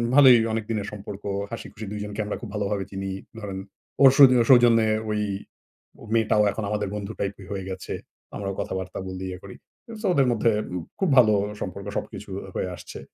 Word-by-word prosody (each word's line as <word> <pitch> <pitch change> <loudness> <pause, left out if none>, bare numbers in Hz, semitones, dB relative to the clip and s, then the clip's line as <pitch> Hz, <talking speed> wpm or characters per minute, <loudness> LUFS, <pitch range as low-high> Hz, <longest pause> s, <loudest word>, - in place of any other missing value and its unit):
ভালোই 130 -4 +9 0.2
অনেক 110 -1 -1
দিনের 105 -3 -2
সম্পর্ক, 105 -1 -8 0.3
হাসিখুশি 110 -1 -7
দুইজনকে 105 0 -5
আমরা 105 - -3
খুব 115 - -7
ভালোভাবে 100 -1 -1
চিনি। 95 0 -4 0.3
ধরেন 100 -3 -5 0.5
ওর 135 - +10
শুধু 135 -3 +9
ও - - +5
সৌজন্যে 120 -3 +6 0.2
ওই 105 - 0 0.9
মেয়েটাও 110 -2 +3
এখন 110 +2 -4
আমাদের 105 -1 -1
বন্ধু 105 0 -4
টাইপের 100 -1 -4
হয়ে 95 -2 -4
গেছে। 95 -1 -5 0.4
আমরাও 100 -1 -3
কথাবার্তা 95 0 -4
বলি, 95 0 -5
ইয়ে 90 0 -6
করি। 95 - -10 0.5
সো - - -4
ওদের 135 -3 +4
মধ্যে 115 0 +2 0.3
উব 85 - -5 0.2
খুব 190 - +2
ভালো 110 -4 +7 0.3
সম্পর্ক 100 +1 -5
সবকিছু 105 - -6 0.2
আ - - -10
হয়ে 95 - -1
আসছে। - - -10
105 Hz, 180 wpm, -25 LUFS, 95-115 Hz, 0.9 s, ওর